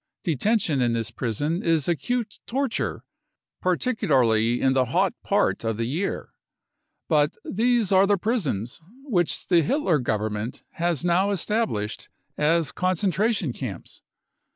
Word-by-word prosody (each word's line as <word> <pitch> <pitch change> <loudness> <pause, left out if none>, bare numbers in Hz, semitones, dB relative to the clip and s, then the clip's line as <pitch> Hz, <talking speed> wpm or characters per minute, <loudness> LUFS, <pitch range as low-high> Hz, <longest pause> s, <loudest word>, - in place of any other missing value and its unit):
Detention 165 - +1
in 120 -1 +2
this 115 0 -2
prison 140 - -2
is 165 -4 +1
acute 220 +6 -2
torture, 265 -1 -2 0.6
particularly 130 - +2
in 130 0 +3
the 130 -1 +3
hot 125 - +1
part - - +1
of 115 -2 -1
the 115 - -1
year. 160 +11 -3 0.7
But 150 -2 +2
these 230 -1 +1
are 190 +1 +5
the 205 0 +3
prisons 160 - -2 0.2
which 185 - 0
the 175 -2 +5
Hitler 175 - +1
Government 110 -1 -2
has 170 -3 -1
now 180 +3 +3
established 200 - -1 0.3
as 160 +1 +2
concentration 185 - 0
camps. 110 -10 -7
165 Hz, 125 wpm, -25 LUFS, 125-200 Hz, 0.7 s, are